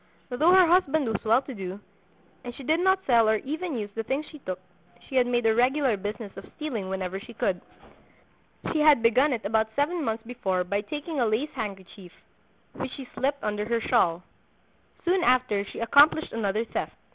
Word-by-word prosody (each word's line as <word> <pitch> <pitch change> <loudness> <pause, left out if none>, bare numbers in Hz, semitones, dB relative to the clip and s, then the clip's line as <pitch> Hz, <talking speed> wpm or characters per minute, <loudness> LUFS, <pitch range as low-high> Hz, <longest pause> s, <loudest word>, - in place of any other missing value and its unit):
Though 305 +8 +3
her 370 -1 +7
husband 320 -4 +3
was 220 -3 -2
well 230 +4 +3
to 265 - -8
do, 190 -2 -6 0.6
and 245 -1 -7
she 275 - -10
did 315 +5 +1
not 380 +1 +2
sell 230 -4 +4
or 220 - +4
even 300 - -4
use 205 -2 -5
the 225 - -3
things 270 +7 -2
she 305 - -11
took, 185 -7 -5 0.5
she 265 - -7
had 250 -1 +4
made 240 -1 0
a 225 - +4
regular 255 +1 +2
business 205 +1 -6
of - - -11
stealing 240 -11 -4
whenever 190 0 -3
she 235 +3 -12
could. 185 -3 -1 1.1
She 315 - +1
had 300 -6 +5
begun 255 +6 +4
it 230 -5 -3
about 220 +1 +1
seven 310 +4 0
months 225 -2 -2
before 200 -7 -1
by 200 +3 -1
taking 295 +6 -5
a 240 - +2
lace 225 +8 -1
handkerchief, 195 -5 -7 0.6
which - - -5
she 270 -2 -8
slipped 280 +1 -1
under 210 0 -2
her 235 +1 0
shawl: 180 -8 +1 0.8
Soon 360 +1 +2
after 250 -5 +2
she - - -10
accomplished 290 +7 +4
another 220 0 -1
theft. - - -4
240 Hz, 190 wpm, -26 LUFS, 210-285 Hz, 1.1 s, her